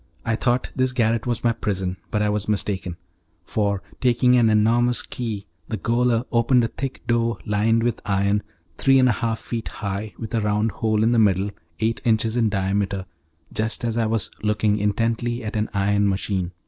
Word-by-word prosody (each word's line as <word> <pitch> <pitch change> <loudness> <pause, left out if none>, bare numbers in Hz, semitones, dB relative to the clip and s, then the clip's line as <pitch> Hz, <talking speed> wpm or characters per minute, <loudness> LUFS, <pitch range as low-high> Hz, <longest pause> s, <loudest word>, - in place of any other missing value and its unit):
I 115 - +1
thought 120 +2 0
this 130 -1 +1
garret 115 -1 +1
was 120 -1 -1
my 120 - +4
prison, 95 -5 -2
but 105 - 0
I 105 - +2
was 105 0 -1
mistaken; 95 -4 -2 0.5
for, 100 -1 -1 0.2
taking 125 0 +4
an 120 -2 +5
enormous 115 +3 +3
key, 110 -5 -5 0.2
the 110 - -3
gaoler 120 +2 +1
opened 120 +1 +3
a 115 - 0
thick 135 -1 -6
door 115 -2 +1
lined 110 +2 +2
with 120 -1 -1
iron, 100 0 +1 0.4
three 135 0 +5
and 130 -1 +5
a - - +4
half 110 +1 -1
feet 115 0 -5
high, 100 +1 -5
with 115 -1 -7
a 115 - +1
round 105 +1 +1
hole 110 -1 0
in 115 - +3
the 120 - +3
middle, 100 -1 +3 0.3
eight 115 +1 0
inches 110 0 +2
in 115 -3 +2
diameter, 100 -1 -1 0.5
just 110 +2 -2
as 115 -1 -1
I 115 -1 +1
was 110 -1 0
looking 105 0 +1
intently 115 +3 0
at 110 0 -5
an 110 0 0
iron 100 0 +2
machine. 95 -2 -1
110 Hz, 185 wpm, -23 LUFS, 105-115 Hz, 0.5 s, an